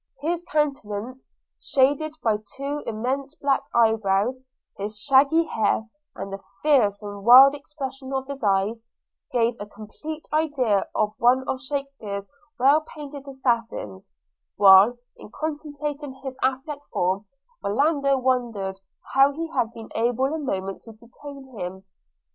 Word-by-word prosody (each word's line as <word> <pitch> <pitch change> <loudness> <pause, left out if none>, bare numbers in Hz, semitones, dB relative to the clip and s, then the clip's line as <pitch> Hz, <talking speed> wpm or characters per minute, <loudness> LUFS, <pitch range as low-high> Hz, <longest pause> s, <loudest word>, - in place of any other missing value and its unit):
His 335 +4 -1
dark 345 - -18 0.2
countenance 230 +2 -8 0.3
shaded 290 +3 +2
by 220 -2 +2 0.2
two 285 +2 -3
immense 265 +6 -2
black 280 -3 +1
eyebrows, 220 +1 +2 0.4
his 210 +1 -5
shaggy 280 +6 +4
hair, 220 -6 0 0.3
and 195 - -6
the 195 - -6 0.2
fierce 225 -9 +3
and 205 -1 -7
wild 260 +5 +9
expression 275 -2 -7
of 265 -1 -2
his 275 -2 -7
eyes, 205 +3 +1 0.5
gave 235 -1 +2
a 205 - -6
complete 260 +10 -8
idea 275 -10 +1
of 210 0 +1
one 255 +2 +3
of 260 - -2
Shakespeare's 270 -8 -5 0.3
well 280 +4 +5
painted 290 -2 -10
assassins; 235 - -2 0.5
while, 200 +4 +7 0.2
in - - -12
contemplating 295 0 -5
his 265 -1 -7
athletic 265 +3 -1
form, 190 +3 -1 0.4
Orlando 275 +5 +2
wondered 235 -7 -1 0.3
how 275 +1 +6
he 330 +2 -4
had 230 -8 0
been 225 -1 -10
able 245 +5 +1
a 320 - -2
moment 195 -9 -3
to 225 - -12
detain 265 +4 -12
him. 190 +2 -6
260 Hz, 135 wpm, -24 LUFS, 215-280 Hz, 0.5 s, wild